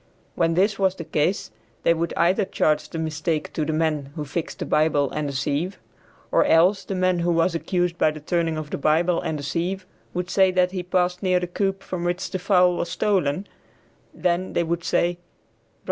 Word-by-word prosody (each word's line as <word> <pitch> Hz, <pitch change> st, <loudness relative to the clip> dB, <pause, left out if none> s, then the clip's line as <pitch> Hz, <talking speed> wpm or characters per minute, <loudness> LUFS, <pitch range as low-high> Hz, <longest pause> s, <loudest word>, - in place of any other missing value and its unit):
When 165 Hz, -1 st, +1 dB
this 195 Hz, +3 st, +2 dB
was 190 Hz, -1 st, +2 dB
the 170 Hz, -, -6 dB
case 155 Hz, -, -1 dB, 0.3 s
they 170 Hz, -, +5 dB
would 170 Hz, 0 st, -2 dB
either 185 Hz, +5 st, +3 dB
charge 155 Hz, -5 st, 0 dB
the -, -, -6 dB
mistake 155 Hz, 0 st, -2 dB
to 155 Hz, -, -1 dB
the 160 Hz, -, -1 dB
men 155 Hz, -3 st, 0 dB
who 150 Hz, -2 st, -4 dB
fixed 155 Hz, +4 st, -4 dB
the -, -, -4 dB
Bible 150 Hz, -2 st, +2 dB
and 150 Hz, -1 st, -2 dB
the -, -, -5 dB
sieve, 145 Hz, +8 st, -1 dB, 0.5 s
or -, -, +4 dB
else 180 Hz, +5 st, +4 dB
the 195 Hz, -, -4 dB
man 185 Hz, -1 st, +2 dB
who 170 Hz, +1 st, +1 dB
was 165 Hz, +1 st, +2 dB
accused 175 Hz, +1 st, -1 dB
by -, -, +4 dB
the 155 Hz, 0 st, -6 dB
turning 165 Hz, +1 st, -1 dB
of 155 Hz, -1 st, -6 dB
the -, -, -3 dB
Bible 165 Hz, +4 st, +2 dB
and 155 Hz, -, -2 dB
the 145 Hz, -, -6 dB
sieve, 180 Hz, +6 st, -2 dB, 0.3 s
would 180 Hz, +1 st, -2 dB
say 190 Hz, -1 st, +5 dB
that 180 Hz, 0 st, +2 dB
he 185 Hz, -1 st, -3 dB
passed 180 Hz, 0 st, 0 dB
near 185 Hz, -1 st, +2 dB
the 180 Hz, -, -2 dB
coop 195 Hz, +2 st, -2 dB
from 180 Hz, -2 st, -4 dB
which 175 Hz, 0 st, -2 dB
the 185 Hz, -, -2 dB
fowl 180 Hz, -2 st, +3 dB
was -, -, -2 dB
stolen, 190 Hz, -4 st, 0 dB, 0.7 s
then 180 Hz, +1 st, -1 dB
they -, -, +2 dB
would 170 Hz, +1 st, -2 dB
say, 170 Hz, +1 st, +2 dB
"Bro. -, -, -33 dB
170 Hz, 210 wpm, -24 LUFS, 155-185 Hz, 0.7 s, they